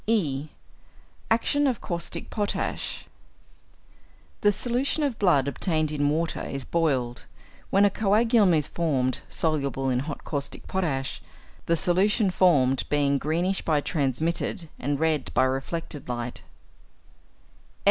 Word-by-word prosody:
(e) 155 Hz, -10 st, 0 dB, 0.8 s
=Action 280 Hz, +6 st, +2 dB
of 250 Hz, -5 st, 0 dB
Caustic 170 Hz, -1 st, -4 dB
Potash.= 205 Hz, -2 st, -2 dB, 1.4 s
The 205 Hz, -, +5 dB
solution 245 Hz, +8 st, 0 dB
of 270 Hz, -6 st, -1 dB
blood 145 Hz, -9 st, +3 dB
obtained 155 Hz, +1 st, 0 dB
in 145 Hz, -1 st, +1 dB
water 160 Hz, +2 st, -1 dB
is 135 Hz, -1 st, -5 dB
boiled, 135 Hz, -8 st, 0 dB, 0.4 s
when 200 Hz, +1 st, +5 dB
a 200 Hz, -, +3 dB
coagulum 215 Hz, -2 st, +3 dB
is 150 Hz, -2 st, +1 dB
formed 135 Hz, -7 st, 0 dB
soluble 140 Hz, -4 st, 0 dB
in 125 Hz, -, +1 dB
hot 145 Hz, +2 st, -5 dB
caustic 140 Hz, -2 st, -4 dB
potash, 150 Hz, -9 st, -2 dB, 0.5 s
the 170 Hz, -, +3 dB
solution 195 Hz, +4 st, +2 dB
formed 135 Hz, -9 st, +3 dB
being 140 Hz, -1 st, +2 dB
greenish 175 Hz, +7 st, 0 dB
by 155 Hz, -2 st, +1 dB
transmitted 160 Hz, -, -1 dB
and 140 Hz, +2 st, -1 dB
red 160 Hz, -3 st, 0 dB
by -, -, +5 dB
reflected 135 Hz, +2 st, -3 dB
light. 120 Hz, 0 st, -4 dB
160 Hz, 120 wpm, -26 LUFS, 140-195 Hz, 1.4 s, The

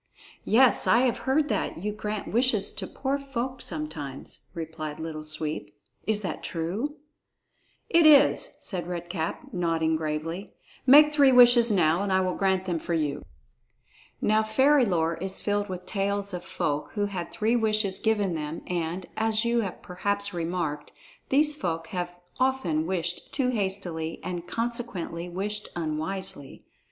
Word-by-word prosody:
"Yes, 250 Hz, +3 st, +5 dB
I 235 Hz, -, +5 dB
have 255 Hz, -2 st, +1 dB
heard 290 Hz, +2 st, +3 dB
that 210 Hz, -, -1 dB
you 205 Hz, +5 st, -3 dB
grant 210 Hz, -1 st, -5 dB
wishes 235 Hz, -3 st, +3 dB
to -, -, -6 dB
poor 275 Hz, +1 st, -2 dB
folk 260 Hz, -2 st, -4 dB
sometimes," 150 Hz, -4 st, -4 dB
replied 160 Hz, -2 st, -5 dB
Little 160 Hz, -1 st, -5 dB
Sweep; 155 Hz, -8 st, -4 dB, 0.3 s
"is 215 Hz, -1 st, +1 dB
that 180 Hz, -6 st, -4 dB
true?" 195 Hz, -, -3 dB, 0.9 s
"It 335 Hz, -2 st, +5 dB
is," 295 Hz, -, +6 dB
said 175 Hz, -4 st, -4 dB
Red 175 Hz, -1 st, -5 dB
Cap, 165 Hz, -3 st, -4 dB
nodding 165 Hz, -3 st, +1 dB
gravely. 160 Hz, +4 st, -4 dB, 0.3 s
"Make 300 Hz, +3 st, +8 dB
three 280 Hz, -3 st, +6 dB
wishes 245 Hz, -1 st, +7 dB
now, 175 Hz, -4 st, +3 dB
and 200 Hz, -1 st, -1 dB
I 190 Hz, -, +4 dB
will 185 Hz, -1 st, 0 dB
grant 190 Hz, -1 st, +1 dB
them 175 Hz, -3 st, -1 dB
for 170 Hz, +1 st, -2 dB
you." 150 Hz, -3 st, -1 dB, 1.0 s
Now 215 Hz, +1 st, +3 dB
fairy 260 Hz, +5 st, +4 dB
lore 165 Hz, -4 st, 0 dB
is 190 Hz, +1 st, -4 dB
filled 205 Hz, 0 st, -1 dB
with 180 Hz, -1 st, -6 dB
tales 200 Hz, -1 st, -1 dB
of 175 Hz, -1 st, -4 dB
folk 145 Hz, 0 st, -2 dB
who 205 Hz, -1 st, +1 dB
had 185 Hz, -4 st, -5 dB
three 225 Hz, +2 st, +1 dB
wishes 215 Hz, -4 st, +1 dB
given 210 Hz, -4 st, +1 dB
them, 155 Hz, 0 st, -4 dB
and, 175 Hz, +1 st, -3 dB
as 220 Hz, +1 st, +1 dB
you 235 Hz, 0 st, +2 dB
have 195 Hz, -5 st, -4 dB
perhaps 200 Hz, +2 st, -2 dB
remarked, 165 Hz, -4 st, -3 dB, 0.4 s
these 300 Hz, +2 st, +4 dB
folk 165 Hz, -, -3 dB
have 175 Hz, -1 st, -4 dB, 0.2 s
often 255 Hz, -13 st, +1 dB
wished 175 Hz, -1 st, -2 dB
too 265 Hz, -3 st, +1 dB
hastily 190 Hz, -7 st, -2 dB
and 175 Hz, -1 st, -5 dB
consequently 230 Hz, -7 st, -3 dB
wished 205 Hz, +4 st, -3 dB
unwisely. 160 Hz, -1 st, -4 dB
190 Hz, 150 wpm, -27 LUFS, 165-225 Hz, 1.0 s, Make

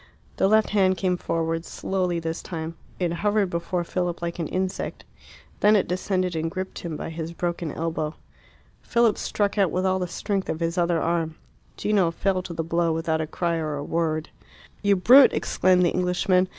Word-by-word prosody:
The -, -, +3 dB
left 215 Hz, +1 st, +3 dB
hand 190 Hz, -3 st, +3 dB
came 185 Hz, -1 st, +1 dB
forward, 165 Hz, -1 st, -2 dB
slowly 180 Hz, -1 st, -2 dB
this 165 Hz, 0 st, -4 dB
time. 160 Hz, -1 st, -5 dB, 0.2 s
It 175 Hz, -2 st, 0 dB
hovered 205 Hz, +1 st, +1 dB
before 175 Hz, +1 st, -1 dB
Philip 175 Hz, 0 st, -2 dB
like 170 Hz, 0 st, -4 dB
an 165 Hz, -, -1 dB
insect. 185 Hz, +2 st, -3 dB, 0.6 s
Then 210 Hz, +1 st, +5 dB
it 200 Hz, -, +2 dB
descended 185 Hz, -1 st, -1 dB
and 160 Hz, +1 st, -1 dB
gripped 190 Hz, +1 st, -5 dB
him 165 Hz, -3 st, -5 dB
by -, -, -5 dB
his 165 Hz, 0 st, -5 dB
broken 170 Hz, -2 st, -2 dB
elbow. 160 Hz, -1 st, -3 dB, 0.7 s
Philip 235 Hz, -3 st, +2 dB
struck 205 Hz, 0 st, -1 dB
out 195 Hz, -3 st, +4 dB
with 185 Hz, +3 st, -1 dB
all 190 Hz, 0 st, +2 dB
the 180 Hz, -, -2 dB
strength 195 Hz, +2 st, -2 dB
of 160 Hz, -, -2 dB
his 170 Hz, 0 st, -1 dB
other 170 Hz, -2 st, +2 dB
arm. 165 Hz, -1 st, -1 dB, 0.4 s
Gino 200 Hz, -5 st, +2 dB
fell 185 Hz, +2 st, 0 dB
to 180 Hz, -1 st, -7 dB
the 165 Hz, -, -1 dB
blow 170 Hz, +1 st, +1 dB
without 160 Hz, 0 st, 0 dB
a 155 Hz, -, -3 dB
cry 170 Hz, +1 st, -1 dB
or 155 Hz, -2 st, -2 dB
a 145 Hz, -, -4 dB
word. 155 Hz, 0 st, -1 dB, 0.5 s
"You 200 Hz, -1 st, +4 dB
brute!" 255 Hz, +9 st, +7 dB
exclaimed 180 Hz, -1 st, +3 dB
the 175 Hz, -, +2 dB
Englishman. 180 Hz, +1 st, +2 dB
175 Hz, 190 wpm, -25 LUFS, 165-190 Hz, 0.7 s, brute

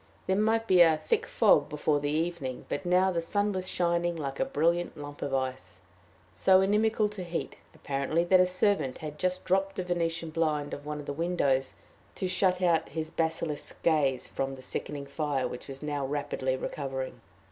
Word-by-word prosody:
There 190 Hz, -, +1 dB
might 220 Hz, +2 st, +2 dB
be 185 Hz, -4 st, +5 dB
a 165 Hz, -2 st, +6 dB
thick 155 Hz, -, 0 dB
fog -, -, +4 dB
before 150 Hz, 0 st, +1 dB
the 145 Hz, 0 st, -2 dB
evening, 155 Hz, -4 st, -2 dB
but 185 Hz, -, -3 dB
now 185 Hz, +2 st, +4 dB
the 170 Hz, -2 st, 0 dB
sun 205 Hz, +5 st, 0 dB
was 185 Hz, -1 st, -3 dB
shining 170 Hz, 0 st, +1 dB
like 140 Hz, -4 st, -4 dB
a -, -, +2 dB
brilliant 170 Hz, +3 st, 0 dB
lump 145 Hz, 0 st, -8 dB
of 140 Hz, -, -2 dB
ice 130 Hz, -1 st, -3 dB, 0.5 s
so 190 Hz, -1 st, +5 dB
inimical 215 Hz, +2 st, +2 dB
to 205 Hz, -3 st, -6 dB
heat, 170 Hz, -1 st, -4 dB, 0.2 s
apparently, 140 Hz, +4 st, 0 dB
that 185 Hz, +1 st, +5 dB
a 180 Hz, -, +5 dB
servant 185 Hz, -7 st, +1 dB
had 150 Hz, -1 st, -7 dB
just 185 Hz, 0 st, -1 dB
dropped 195 Hz, +1 st, +1 dB
the 185 Hz, -, -2 dB
venetian 170 Hz, -2 st, -2 dB
blind 155 Hz, -3 st, 0 dB
of 145 Hz, +1 st, -7 dB
one 150 Hz, 0 st, -3 dB
of 145 Hz, -, -8 dB
the 145 Hz, -, -3 dB
windows 140 Hz, -5 st, 0 dB, 0.4 s
to 185 Hz, -, -2 dB
shut 185 Hz, 0 st, +2 dB, 0.3 s
his 160 Hz, 0 st, -4 dB
basilisk 160 Hz, -2 st, -3 dB
gaze 145 Hz, -6 st, +2 dB
from 135 Hz, 0 st, -3 dB
the 130 Hz, -, -12 dB
sickening 145 Hz, +1 st, -5 dB
fire, 140 Hz, -2 st, -1 dB
which 125 Hz, -, -8 dB
was 135 Hz, +1 st, -8 dB
now 145 Hz, -2 st, -2 dB
rapidly 135 Hz, -2 st, -1 dB
recovering. 135 Hz, -1 st, -4 dB
160 Hz, 185 wpm, -29 LUFS, 145-180 Hz, 0.5 s, a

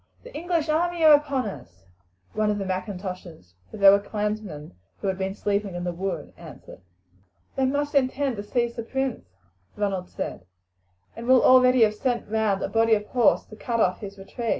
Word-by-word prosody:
"The -, -, -12 dB
English 335 Hz, -1 st, -1 dB
army 340 Hz, +2 st, 0 dB
are 310 Hz, -, +9 dB
upon 280 Hz, -4 st, +2 dB
us!" 90 Hz, -, -9 dB, 0.5 s
one 215 Hz, 0 st, 0 dB
of 210 Hz, -, 0 dB
the 195 Hz, -, -3 dB
M'Intoshes 185 Hz, -, -6 dB, 0.2 s
for -, -, -9 dB
they 200 Hz, -1 st, +5 dB
were 200 Hz, +1 st, +8 dB
clansmen 210 Hz, -7 st, -4 dB, 0.3 s
who -, -, -4 dB
had 190 Hz, 0 st, -2 dB
been 190 Hz, +1 st, -2 dB
sleeping 200 Hz, -2 st, -2 dB
in 175 Hz, -, -4 dB
the 175 Hz, -, -2 dB
wood 190 Hz, +2 st, -4 dB
answered. -, -, -13 dB, 0.7 s
"They 265 Hz, -1 st, +1 dB
must 285 Hz, +2 st, -1 dB
intend 270 Hz, -2 st, +1 dB
to 205 Hz, -, -5 dB
seize 235 Hz, +2 st, -1 dB
the 230 Hz, -, -4 dB
prince," 265 Hz, -, -3 dB, 0.5 s
Ronald 195 Hz, -3 st, -2 dB
said, 90 Hz, -, -6 dB, 0.7 s
"and 230 Hz, +1 st, -8 dB
will 255 Hz, -1 st, +5 dB
already 255 Hz, -1 st, +6 dB
have 215 Hz, -1 st, +3 dB
sent 245 Hz, +2 st, -2 dB
round 215 Hz, -2 st, 0 dB
a -, -, -1 dB
body 225 Hz, 0 st, +3 dB
of 210 Hz, 0 st, -3 dB
horse 245 Hz, -4 st, +3 dB
to 215 Hz, -, -13 dB
cut 230 Hz, +1 st, -3 dB
off 180 Hz, -4 st, +2 dB
his 200 Hz, -1 st, -8 dB
retreat. 225 Hz, +4 st, -6 dB
215 Hz, 190 wpm, -25 LUFS, 195-255 Hz, 0.7 s, are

